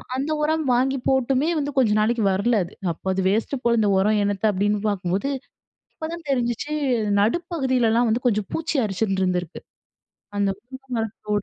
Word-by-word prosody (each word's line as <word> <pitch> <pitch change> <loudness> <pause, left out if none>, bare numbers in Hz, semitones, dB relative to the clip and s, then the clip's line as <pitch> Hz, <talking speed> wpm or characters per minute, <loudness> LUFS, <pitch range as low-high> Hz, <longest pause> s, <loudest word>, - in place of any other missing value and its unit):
அந்த 275 +4 -2
உரம் 315 0 +1
வாங்கி 265 +2 +1
போட்டுமே 265 +3 +2
வந்து 290 0 -2
கொஞ்ச 245 -5 +4
நாளைக்கு 225 +1 +1
வரல 215 +4 +2
அது. 175 - -10 0.2
அப்போ 165 - -11
"அது 190 - 0
வேஸ்ட்டு 230 +6 -1
போல, 235 0 +3
இந்த 210 -2 +3
உரம் 210 +2 +2
என்னத்த?" 200 +1 -1
அப்பிடீன்னு 205 +2 0
பார்க்கும்போது, 195 +5 -1 0.6
அப்பதான் 330 +1 -6
தெரிஞ்சுச்சு. 245 +3 -1 0.5
நடுப்பகுதிலலாம் 245 - +1
வந்து 235 +4 0
கொஞ்சம் 210 -4 0
பூச்சி 325 -1 -2
அரிச்சிண்டிருந்திருக்கு. 190 -4 -1 0.8
அந்த 200 -1 +2
பூக்களும் 250 -2 -5 0.2
கூட 210 -1 0
235 Hz, 145 wpm, -23 LUFS, 205-265 Hz, 0.8 s, கொஞ்ச